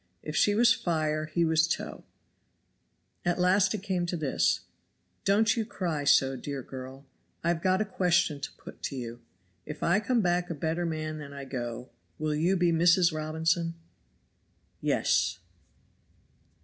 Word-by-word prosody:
If 150 Hz, -, -5 dB
she 205 Hz, -, +3 dB
was 235 Hz, +1 st, +6 dB
fire 155 Hz, -5 st, -1 dB
he 170 Hz, +2 st, +1 dB
was 160 Hz, 0 st, +3 dB
tow. -, -, -4 dB, 1.2 s
At 175 Hz, -1 st, +1 dB
last 185 Hz, +3 st, +3 dB
it 200 Hz, -, -6 dB
came 185 Hz, -3 st, -1 dB
to 175 Hz, -, -2 dB
this: 150 Hz, -4 st, +1 dB, 0.6 s
"Don't 215 Hz, +3 st, +4 dB
you 230 Hz, -, 0 dB
cry 170 Hz, -9 st, -3 dB
so, 135 Hz, -1 st, +4 dB
dear 140 Hz, 0 st, -5 dB
girl. 130 Hz, +2 st, -9 dB, 0.4 s
I 170 Hz, -, +1 dB
have 170 Hz, -1 st, 0 dB
got 185 Hz, +2 st, +2 dB
a -, -, +1 dB
question 175 Hz, -6 st, +1 dB
to -, -, -5 dB
put -, -, -13 dB
to 140 Hz, -, -4 dB
you 120 Hz, -2 st, -6 dB, 0.5 s
IF -, -, -6 dB
I 175 Hz, +4 st, +3 dB
COME 235 Hz, +2 st, +1 dB
BACK 175 Hz, -1 st, +1 dB
A 170 Hz, -, -3 dB
BETTER 165 Hz, +3 st, -1 dB
MAN 155 Hz, -1 st, -3 dB
THAN 140 Hz, -1 st, -9 dB
I 140 Hz, -1 st, -7 dB
GO, 125 Hz, -2 st, -5 dB, 0.3 s
WILL 155 Hz, 0 st, -1 dB
YOU 170 Hz, +6 st, +2 dB
BE 175 Hz, -1 st, +3 dB
MRS. 170 Hz, +1 st, +4 dB
ROBINSON?" 160 Hz, +2 st, 0 dB, 1.1 s
"Yes." 90 Hz, +1 st, +1 dB
165 Hz, 160 wpm, -29 LUFS, 145-180 Hz, 1.2 s, was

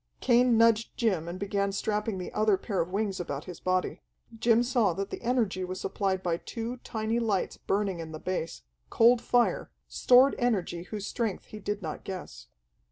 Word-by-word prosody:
Cain 245 Hz, -1 st, +4 dB
nudged 230 Hz, 0 st, +3 dB
Jim 190 Hz, -9 st, 0 dB
and 175 Hz, +1 st, -5 dB
began 200 Hz, 0 st, -1 dB
strapping 210 Hz, +1 st, -1 dB
the 180 Hz, -, -6 dB
other 215 Hz, -2 st, +3 dB
pair 195 Hz, 0 st, -2 dB
of 170 Hz, -, -3 dB
wings 195 Hz, 0 st, -2 dB
about 145 Hz, -4 st, -4 dB
his 180 Hz, -, -9 dB
body. 185 Hz, 0 st, -1 dB, 0.3 s
Jim 230 Hz, +1 st, +3 dB
saw 235 Hz, -7 st, +2 dB
that 195 Hz, +3 st, -4 dB
the -, -, -6 dB
energy 230 Hz, -7 st, 0 dB
was 185 Hz, +1 st, -5 dB
supplied 190 Hz, -1 st, -1 dB
by 170 Hz, -2 st, 0 dB
two 230 Hz, +6 st, -5 dB
tiny, 225 Hz, -1 st, -2 dB
lights 210 Hz, -5 st, -1 dB
burning 195 Hz, -3 st, -1 dB
in 160 Hz, -1 st, -6 dB
the 155 Hz, -, -6 dB
base, 165 Hz, -, -4 dB, 0.3 s
cold 235 Hz, +1 st, +5 dB
fire, 245 Hz, -1 st, +1 dB, 0.2 s
stored 255 Hz, +2 st, +5 dB
energy 195 Hz, -8 st, 0 dB
whose 205 Hz, 0 st, -5 dB
strength 220 Hz, -5 st, -3 dB
he 215 Hz, -, -10 dB
did 205 Hz, 0 st, -4 dB
not 155 Hz, -2 st, -5 dB
guess. -, -, -8 dB
205 Hz, 180 wpm, -28 LUFS, 185-230 Hz, 0.3 s, cold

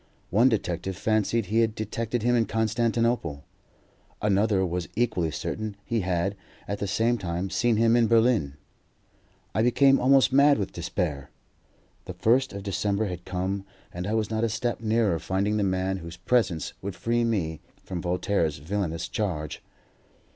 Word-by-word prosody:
One 115 Hz, +8 st, +5 dB
detective 95 Hz, -4 st, -2 dB
fancied 110 Hz, +1 st, +1 dB
he 110 Hz, +4 st, +1 dB
had 110 Hz, -1 st, +2 dB
detected 110 Hz, +2 st, -3 dB
him 120 Hz, +1 st, +3 dB
in 115 Hz, -3 st, +2 dB
Constantinople; 115 Hz, -7 st, 0 dB, 0.8 s
another 100 Hz, -1 st, +2 dB
was 90 Hz, -2 st, -3 dB
equally 110 Hz, -8 st, +1 dB
certain 105 Hz, +6 st, -4 dB
he 115 Hz, -2 st, 0 dB
had, 95 Hz, +1 st, -1 dB, 0.3 s
at 100 Hz, 0 st, -3 dB
the 100 Hz, -, -2 dB
same 115 Hz, +4 st, +1 dB
time, 90 Hz, +1 st, -3 dB
seen 120 Hz, -2 st, +2 dB
him 115 Hz, +1 st, +4 dB
in 120 Hz, -1 st, +4 dB
Berlin. 115 Hz, -, +3 dB, 1.0 s
I 110 Hz, -, +1 dB
became 135 Hz, +4 st, +4 dB
almost 135 Hz, 0 st, +4 dB
mad 140 Hz, +1 st, +6 dB
with 100 Hz, -, -3 dB
despair. 70 Hz, -6 st, -3 dB, 0.8 s
The -, -, -7 dB
first 130 Hz, +4 st, +2 dB
of 100 Hz, -1 st, -7 dB
December 100 Hz, +1 st, 0 dB
had 90 Hz, -1 st, -7 dB
come, 95 Hz, +2 st, -2 dB, 0.3 s
and 90 Hz, +2 st, -4 dB
I 110 Hz, -, 0 dB
was 110 Hz, -1 st, -1 dB
not 110 Hz, 0 st, 0 dB
a 115 Hz, -, +2 dB
step 120 Hz, +1 st, -2 dB
nearer 110 Hz, -6 st, +1 dB
finding 100 Hz, +5 st, 0 dB
the 105 Hz, -, +1 dB
man 95 Hz, 0 st, 0 dB
whose 85 Hz, -1 st, -9 dB
presence 90 Hz, -, 0 dB
would 95 Hz, -1 st, -5 dB
free 120 Hz, +3 st, 0 dB
me 90 Hz, -9 st, -1 dB, 0.2 s
from 90 Hz, -2 st, -5 dB
Voltaire's 90 Hz, -3 st, 0 dB
villainous 85 Hz, +2 st, -3 dB
charge. 80 Hz, -8 st, -3 dB
105 Hz, 160 wpm, -26 LUFS, 90-115 Hz, 1.0 s, mad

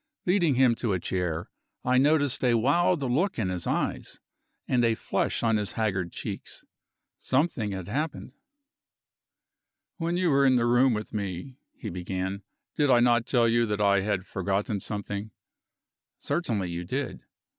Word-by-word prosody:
Leading 175 Hz, -6 st, +3 dB
him 130 Hz, -2 st, +5 dB
to 115 Hz, -5 st, -1 dB
a 90 Hz, -, 0 dB
chair, 85 Hz, -2 st, -3 dB, 0.3 s
I 125 Hz, 0 st, +4 dB
noticed 145 Hz, -1 st, +2 dB
a 120 Hz, -2 st, +4 dB
wild 145 Hz, +7 st, +2 dB
look 150 Hz, +10 st, 0 dB
in 105 Hz, -6 st, -1 dB
his 90 Hz, -2 st, -3 dB
eyes, -, -, -2 dB, 0.5 s
and 125 Hz, -1 st, +2 dB
a 115 Hz, -1 st, +3 dB
flush -, -, -1 dB
on 115 Hz, -2 st, +3 dB
his 105 Hz, -4 st, -2 dB
haggard 95 Hz, -6 st, -1 dB
cheeks. -, -, -7 dB, 0.6 s
Something 130 Hz, -6 st, 0 dB
had 95 Hz, -2 st, -5 dB
happened. 145 Hz, +3 st, -3 dB, 1.6 s
"When 170 Hz, 0 st, -1 dB
you 180 Hz, -3 st, +2 dB
were 140 Hz, -, +4 dB
with 140 Hz, -1 st, +5 dB
me -, -, +4 dB
in -, -, +4 dB
my 110 Hz, -6 st, +1 dB
room," 135 Hz, -2 st, -14 dB, 0.2 s
he -, -, -6 dB
began, 95 Hz, +2 st, -4 dB, 0.3 s
"did 145 Hz, -2 st, +2 dB
I 125 Hz, -2 st, +6 dB
not 120 Hz, 0 st, +3 dB
tell 120 Hz, -3 st, +3 dB
you 120 Hz, 0 st, +2 dB
that 105 Hz, -1 st, -2 dB
I 100 Hz, -1 st, +4 dB
had 95 Hz, -1 st, -1 dB
forgotten 100 Hz, +3 st, -2 dB
something?" 100 Hz, +1 st, -4 dB, 0.9 s
"Certainly 105 Hz, -, -2 dB
you 85 Hz, +1 st, -4 dB
did." 130 Hz, +10 st, -3 dB
115 Hz, 155 wpm, -27 LUFS, 100-135 Hz, 1.6 s, I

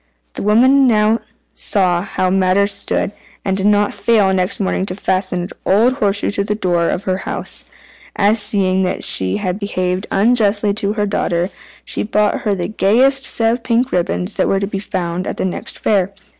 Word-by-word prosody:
The -, -, -6 dB
woman 260 Hz, +6 st, +4 dB
now 215 Hz, 0 st, +2 dB, 0.3 s
saw 180 Hz, -4 st, 0 dB
how 185 Hz, -1 st, -2 dB
matters 195 Hz, +2 st, +2 dB
stood, -, -, -1 dB, 0.3 s
and 190 Hz, -, 0 dB
did 195 Hz, +1 st, 0 dB
not 205 Hz, 0 st, +2 dB
fail 210 Hz, -5 st, +2 dB
next 185 Hz, 0 st, 0 dB
morning 190 Hz, -1 st, -1 dB
to 185 Hz, -, -3 dB
fasten 185 Hz, -2 st, -1 dB
an 180 Hz, -, -6 dB
old 225 Hz, +6 st, +3 dB
horseshoe 205 Hz, -7 st, 0 dB
to 200 Hz, 0 st, +1 dB
the 210 Hz, +1 st, -2 dB
door 175 Hz, -4 st, 0 dB
of 185 Hz, -, -2 dB
her 185 Hz, -1 st, -1 dB
house. -, -, -3 dB, 0.5 s
And 205 Hz, +2 st, +3 dB
seeing 200 Hz, -3 st, +3 dB
that 185 Hz, -1 st, -2 dB
she 95 Hz, 0 st, +2 dB
had 190 Hz, -1 st, -3 dB
behaved 185 Hz, -2 st, -2 dB
unjustly 210 Hz, -1 st, +2 dB
to 200 Hz, 0 st, 0 dB
her 210 Hz, -1 st, -1 dB
daughter, 180 Hz, -3 st, -1 dB, 0.3 s
she -, -, -2 dB
bought 210 Hz, 0 st, 0 dB
her 210 Hz, -2 st, 0 dB
the 175 Hz, -2 st, -3 dB
gayest 245 Hz, +7 st, +2 dB
set 225 Hz, 0 st, +2 dB
of 240 Hz, -, -4 dB
pink 250 Hz, +1 st, 0 dB
ribbons 180 Hz, +2 st, -1 dB
that -, -, +1 dB
were 195 Hz, -, +1 dB
to 200 Hz, -, -1 dB
be 195 Hz, -1 st, -4 dB
found 180 Hz, -2 st, -4 dB
at -, -, -4 dB
the -, -, -1 dB
next 185 Hz, -, -4 dB
fair. 195 Hz, -3 st, 0 dB
200 Hz, 190 wpm, -17 LUFS, 185-215 Hz, 0.5 s, woman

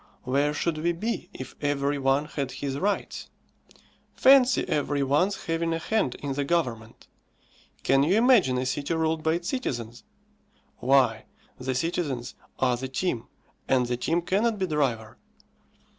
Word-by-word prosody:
Where 140 Hz, +3 st, +1 dB
should 155 Hz, +1 st, -2 dB
we 170 Hz, +2 st, +1 dB
be 190 Hz, 0 st, -3 dB
if 130 Hz, -7 st, -8 dB
every 145 Hz, 0 st, 0 dB
one 135 Hz, +2 st, +2 dB
had 140 Hz, -4 st, -4 dB
his 140 Hz, 0 st, -4 dB
rights? 200 Hz, +4 st, -2 dB, 0.9 s
Fancy 260 Hz, -1 st, +5 dB
every 145 Hz, -1 st, 0 dB
one's 165 Hz, +9 st, +1 dB
having 165 Hz, 0 st, -1 dB
a -, -, -1 dB
hand 165 Hz, -, 0 dB
in 140 Hz, -1 st, -4 dB
the 145 Hz, +1 st, -1 dB
government? 125 Hz, -9 st, -2 dB, 0.8 s
Can 135 Hz, 0 st, +4 dB
you 165 Hz, +7 st, +3 dB
imagine 225 Hz, -, +4 dB
a 130 Hz, -, -1 dB
city 140 Hz, +5 st, -2 dB
ruled 160 Hz, 0 st, 0 dB
by 160 Hz, 0 st, +1 dB
its 175 Hz, +2 st, -3 dB
citizens? 120 Hz, -, -4 dB, 0.7 s
Why, 125 Hz, -3 st, +2 dB, 0.3 s
the 130 Hz, 0 st, -2 dB
citizens 140 Hz, -5 st, -2 dB, 0.2 s
are 125 Hz, -2 st, +1 dB
the 130 Hz, +2 st, -4 dB
team, 130 Hz, -3 st, -2 dB, 0.4 s
and 130 Hz, -2 st, +3 dB
the 120 Hz, 0 st, -1 dB
team 165 Hz, +8 st, -1 dB
cannot 210 Hz, +5 st, +1 dB
be 190 Hz, -, 0 dB
driver. 130 Hz, -9 st, -2 dB
145 Hz, 150 wpm, -26 LUFS, 130-170 Hz, 0.9 s, Fancy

